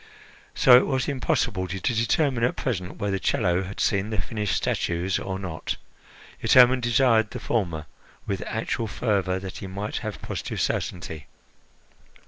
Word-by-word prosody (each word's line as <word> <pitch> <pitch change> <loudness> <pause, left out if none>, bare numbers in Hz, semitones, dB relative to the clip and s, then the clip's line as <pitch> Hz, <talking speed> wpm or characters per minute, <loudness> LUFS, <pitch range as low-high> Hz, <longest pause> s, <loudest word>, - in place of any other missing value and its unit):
So 125 - +7
it 125 - +3
was 130 -3 0
impossible 100 -8 0
to 95 +2 -4
determine 120 - +1
at 125 - +2
present 95 -8 -3
whether 100 -1 -1
Chello 90 0 +1
had 100 - -8
seen 100 +1 +1
the 110 - -2
finished 105 -3 -2
statues 85 +2 0
or 95 -1 -4
not, 90 -5 -4 0.6
yet - - +2
Hermon 125 0 +7
desired 120 -2 +3
the - - -6
former 85 -9 -1 0.4
with 100 -2 -2
actual 110 +1 -2
fervour, 95 -4 0
that 95 0 -7
he 95 - -6
might 100 +3 -4
have - - -5
positive - - -5
certainty. 80 -5 -3
100 Hz, 150 wpm, -25 LUFS, 95-120 Hz, 0.6 s, So